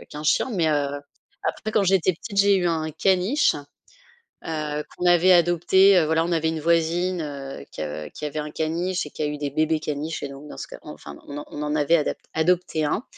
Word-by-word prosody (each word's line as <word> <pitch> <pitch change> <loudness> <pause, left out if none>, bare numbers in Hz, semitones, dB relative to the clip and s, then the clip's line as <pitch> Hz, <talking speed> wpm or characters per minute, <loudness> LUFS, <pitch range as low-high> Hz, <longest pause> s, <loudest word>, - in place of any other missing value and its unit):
qu'un 150 +1 -8
chien 250 - +2
mais, 175 -8 +1
heu, 145 -1 +1 0.6
après 215 - -3
quand 210 - +3
j'étais 185 -1 +3
petite, 200 +4 -6
j'ai 200 0 +5
eu 180 - +1
un 160 -2 -1
caniche, 190 - +2 0.9
heu, 150 -2 -3
qu'on - - -4
avait 175 +1 +6
adopté, 175 +3 +5
heu. 160 - +3
Voilà 160 +1 +2
on 175 - -2
avait 160 -1 +1
une 160 0 -2
voisine, 170 +2 +1
heu, 140 - -7
qui, - - -6
heu, 75 0 -5
qui 150 - -7
avait 150 +1 -3
un 150 0 -4
caniche 170 +4 -1
et - - -9
qui - - -6
a - - +1
eu 150 0 -3
des 145 -1 -3
bébés 155 +2 +1
caniches 155 +1 -4
et 145 - -3
donc 140 +2 -10
dans - - -9
ce - - -6
cas - - -10
enfin, 75 0 -10
on 145 +1 -6
on 150 - -7
en 150 0 -1
avait 155 +3 +4
adap 150 - -1 0.2
adopté 160 -1 +1
un 200 - -1
160 Hz, 225 wpm, -24 LUFS, 150-180 Hz, 0.9 s, avait